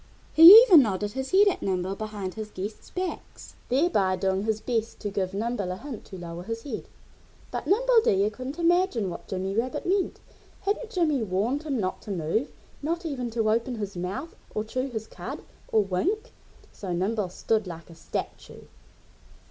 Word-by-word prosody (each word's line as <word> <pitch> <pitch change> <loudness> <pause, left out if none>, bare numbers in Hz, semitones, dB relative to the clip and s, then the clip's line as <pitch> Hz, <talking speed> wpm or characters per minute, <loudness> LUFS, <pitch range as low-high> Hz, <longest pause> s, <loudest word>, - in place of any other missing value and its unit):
He 325 +1 +10 0.2
even 370 -11 +8
nodded 205 -3 -1
his 265 +3 -4
head 400 +2 +5
at 390 - +1
Nimble 185 0 -1
behind 205 -3 -5
his 215 -1 -6
guests' 205 +2 -7
backs, 365 0 -6 0.2
thereby 245 - +2
doing 190 +1 -1
his 220 -1 0
best 225 -1 -2
to 205 - -3
give 195 -1 -2
Nimble 210 -3 -2
a - - -3
hint 265 0 -8
to 190 - -10
lower 170 -1 -7
his 225 +4 -5
head. 285 - -6 0.6
But - - -4
Nimble 475 +3 +4
Deer 200 +2 +2
couldn't 255 +6 -7
imagine 340 - +2
what - - -9
Jimmy 190 +1 -3
Rabbit 240 +3 -2
meant. 380 +1 0 0.4
Hadn't 415 +4 -2
Jimmy 325 - +1
warned 220 +8 0
him 290 -6 -2
not 185 -2 -2
to - - -11
move 190 - -1 0.3
not 335 +4 -2
even 255 -6 -3
to 225 -1 +1
open 235 +3 0
his 205 -3 -5
mouth, 190 - -5 0.2
or 215 - 0
chew 255 +4 -3
his 220 -3 -5
cud, - - -8 0.2
or 215 - +3
wink? 385 - -1 0.4
So 190 -3 -7
Nimble 195 +2 -1
stood 215 +3 -1
like 170 -1 -9
a - - -11
statue. 160 - -6
220 Hz, 180 wpm, -26 LUFS, 195-285 Hz, 0.6 s, He